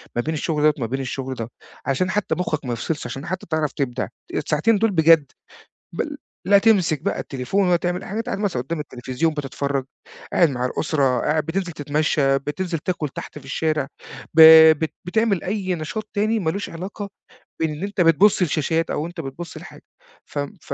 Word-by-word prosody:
ما 120 - +1
بين 160 +5 -3
الشغل 155 -1 -1
ده 150 0 +5
وما 115 -5 -2
بين 135 +3 -3
الشغل 130 0 -4
ده، 115 0 -5 0.4
عشان 160 +7 0
حتى 210 -1 0
مخك 155 -5 -2
ما 120 - -2
يفصلش، 150 +7 -3
عشان 135 +3 -6
حتى 185 +1 -4
تعرف 155 -3 0
تبدع، 130 -2 -2 0.3
الساعتين 160 +9 +2
دول 225 +1 +2
بجد 160 -5 +5 0.6
بل - - -3 0.3
لا 200 +1 +7
تمسك 190 -9 +3
بقى 200 - -1
التليفون 140 +9 -1
ولا 175 - +4
تعمل 175 +1 -2
اى - - -9
حاجه، 205 - -4
أنت 225 - -3
قاعد - - -2
مثلًا 190 -12 -1
قدام 160 +4 -4
التلفزيون 135 +3 -2
بتتفرج، 140 -1 -2 0.5
قاعد 170 - +5
مع 125 -2 -1
الأسرة، 135 -2 +1
قاعد 155 0 +1
بتنزل 180 +1 -2
تتمشى، 145 -2 +1
بتنزل 165 +5 -3
تاكُل 160 -1 -2
تحت 140 - -8
في 140 - -16
الشارع، 150 +1 -1 0.5
ب 160 - +5 0.4
بت 160 -1 -2
بتعمل 205 +1 +1
أي 190 -2 -1
نشاط 205 +7 -5
تاني 215 +2 +1
ما 170 -6 0
لوش 200 +4 -4
علاقة 195 +4 -6 0.5
بإن 155 0 -2
أنت 200 0 -3
بتبُص 180 +4 +5
لشاشات 165 0 0
أو 150 - -2
أنت 170 0 -7
بتبُص 165 +4 -7
لحاجة، - - -11 0.4
فم 145 -1 -4
ف - - -9
160 Hz, 190 wpm, -22 LUFS, 140-185 Hz, 0.6 s, لا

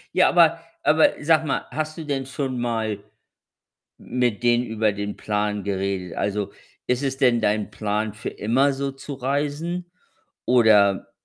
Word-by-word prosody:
Ja, 185 - +5
aber 165 -1 +5 0.2
aber 155 +2 +5
sag 160 +1 +3
mal, 140 - -1
hast 155 +1 -3
du 160 - -6
denn 135 -2 -2
schon 130 -2 -3
mal 110 -4 -2 0.9
mit 120 -3 -1
denen 120 0 +3
über 110 -2 0
den 100 0 -5
Plan 105 -1 -1
geredet? 95 -2 -2
Also, 100 0 -1 0.4
ist 125 +3 0
es 135 -1 -1
denn 125 -4 +3
dein 105 0 0
Plan, 105 +1 -2
für 110 - -5
immer 130 +7 +1
so 135 0 -3
zu 135 +1 -8
reisen 145 +7 -2 0.5
oder? 110 -4 +4
120 Hz, 150 wpm, -23 LUFS, 105-140 Hz, 0.9 s, Ja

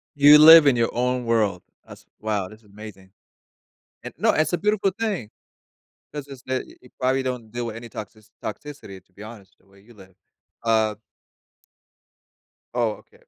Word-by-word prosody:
You 145 +1 +8
live 160 -1 +9
in 135 - +4
your 115 -1 +1
own 125 0 -1
world. 110 -5 0 0.3
That's - - -14
wow, 105 -3 -2
this 110 - -15
is 110 - -28
amazing. 100 -2 -13 0.9
Eh, - - -7
no, - - +2
it's 155 +3 0
a - - +2
beautiful 210 +1 0
thing, 205 - -3 0.8
'cause 145 -1 -7
it's 135 -2 -12
the 130 0 -3
y - - -17
you 125 - -18
probably 130 +1 0
don't 125 -4 -5
deal 120 0 -4
with 110 - -7
any 115 +1 -10
toxici 110 0 -10
toxicity, 105 -6 -8
to 95 - -39
be 105 +3 -12
honest, 105 -4 -13
the - - -31
way 100 0 -22
you 120 +3 -19
live. 95 -3 -18 0.5
Uh 110 -2 +1 1.8
Oh, 115 -3 -2
okay. - - -26
115 Hz, 175 wpm, -23 LUFS, 105-135 Hz, 1.8 s, live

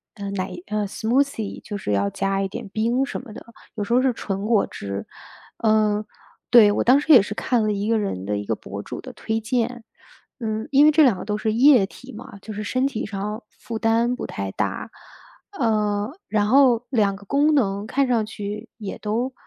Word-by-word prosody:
呃， 200 -2 -5
奶 190 -1 -3 0.2
呃， 210 -1 -1
smoothie， 230 0 -1
就 205 - -5
是 150 - -4
要 100 0 +1
加 195 - -1
一 195 - 0
点 235 +2 -7
冰 235 +6 0
什 - - -5
么 245 -3 -12
的， - - -11 0.3
有 210 - -2
时 205 - -2
候 250 - +5
是 260 -1 +3
纯 195 -3 -4
果 225 -3 +3
汁。 100 0 -6 0.6
嗯， 215 -1 +3 0.5
对， 225 -4 +7
我 - - 0
当 255 +3 +6
时 310 - 0
也 245 - +9
是 210 - -4
看 240 -1 +1
了 215 - +1
一 200 +1 -2
个 225 -1 +3
人 145 - -3
的 105 +1 -1
一 105 - -5
个 110 - -1
博 100 -1 -8
主 - - -7
的 255 - -9
推 225 -1 -2
荐， 240 +1 -2 0.6
嗯， 220 -2 -3
因 285 +2 +6
为 305 - +7
这 310 +1 +5
两 245 -9 +4
个 - - -6
都 210 0 -1
是 220 0 -1
液 250 -3 +6
体 255 +6 -13
嘛， 205 -2 -10
就 220 - -8
是 210 +1 -5
身 255 +5 0
体 240 -6 -4
上 210 +3 -5
负 230 - -7
担 230 +2 +2
不 - - -5
太 100 -1 -4
大。 - - -3 0.7
呃， 210 -2 +1 0.2
然 210 -1 +1
后 250 -2 +4
2 210 -6 +2
个 200 - -15
功 290 +7 +2
能 205 -7 +1
看 270 +4 +1
上 235 -3 +1
去 210 -1 -6
也 210 -4 -6
都 235 +5 -2
220 Hz, 245 characters per minute, -23 LUFS, 200-245 Hz, 0.7 s, 也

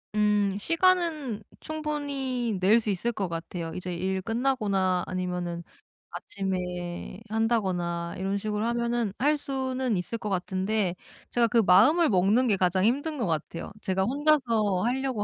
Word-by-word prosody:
음. 205 -2 +2
시간은 330 - +1 0.2
충분히 280 -7 -2
낼 210 +5 +5
수 215 - -3
있을 205 +5 0
것 195 -4 -2
같아요. 165 0 -5
이제 180 0 -4
일 190 +2 -2
끝나거나 205 -6 +1
아니면은 180 -2 -3 0.5
아침에 180 - -4
한다거나 185 -7 -1
이런 195 +2 -1
식으로 210 +1 -2
하면은 235 -2 0
할 295 +3 +2
수는 260 -5 -2
있을 205 +6 -3
것 210 - -4
같은데 190 +1 -1 0.4
제가 235 -1 +3
그 235 +1 +1
마음을 230 - +6
먹는 205 +7 +3
게 205 - +3
가장 185 +1 +2
힘든 285 +6 0
것 235 - -1
같아요. 165 +1 -3
제가 190 0 0
혼자서 235 -8 +2
하려고 255 -3 -1
210 Hz, 295 characters per minute, -27 LUFS, 185-255 Hz, 0.5 s, 마음을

